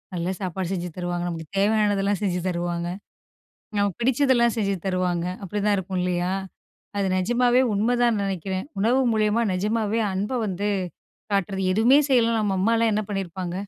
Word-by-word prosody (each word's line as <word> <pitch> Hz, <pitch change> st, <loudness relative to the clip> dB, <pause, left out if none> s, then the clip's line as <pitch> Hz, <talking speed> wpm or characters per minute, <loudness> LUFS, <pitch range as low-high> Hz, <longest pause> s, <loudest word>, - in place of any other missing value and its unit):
"நல்ல 175 Hz, +1 st, -2 dB
சாப்பாடு 185 Hz, 0 st, -3 dB
செஞ்சு 180 Hz, -1 st, -3 dB
தருவாங்க. 175 Hz, -1 st, -2 dB
நமக்கு 165 Hz, -2 st, -6 dB
தேவையானதெல்லாம் 205 Hz, -1 st, +2 dB
செஞ்சு 180 Hz, -3 st, 0 dB
தருவாங்க. 175 Hz, 0 st, -2 dB, 0.9 s
நமக்கு 200 Hz, +1 st, 0 dB
பிடிச்சதெல்லாம் 245 Hz, -2 st, +3 dB
செஞ்சு 200 Hz, -3 st, 0 dB
தருவாங்க." 180 Hz, -2 st, 0 dB, 0.2 s
அப்படிதான் 205 Hz, +2 st, 0 dB
இருக்கும் 185 Hz, 0 st, -3 dB
இல்லையா? 180 Hz, 0 st, 0 dB, 0.7 s
அது 200 Hz, -1 st, +1 dB
நெஜமாவே 240 Hz, +5 st, +3 dB
உண்மைதான் 240 Hz, +3 st, +2 dB
நெனைக்கிறேன். 190 Hz, 0 st, -3 dB
உணவு 235 Hz, +6 st, +3 dB
மூலியமா 215 Hz, +1 st, +2 dB
நெஜமாவே 215 Hz, +3 st, 0 dB
அன்பை 205 Hz, +7 st, -2 dB
வந்து 200 Hz, +1 st, -2 dB, 0.7 s
காட்டுறது. 195 Hz, 0 st, 0 dB
எதுவுமே 230 Hz, +8 st, +5 dB
செய்யலன்னா, 230 Hz, -4 st, +3 dB
நம்ம 195 Hz, -2 st, 0 dB
அம்மால்லாம் 230 Hz, +1 st, +2 dB
என்ன 215 Hz, -, +1 dB
பண்ணியிருப்பாங்க? 185 Hz, -3 st, -4 dB
200 Hz, 135 wpm, -24 LUFS, 180-225 Hz, 0.9 s, எதுவுமே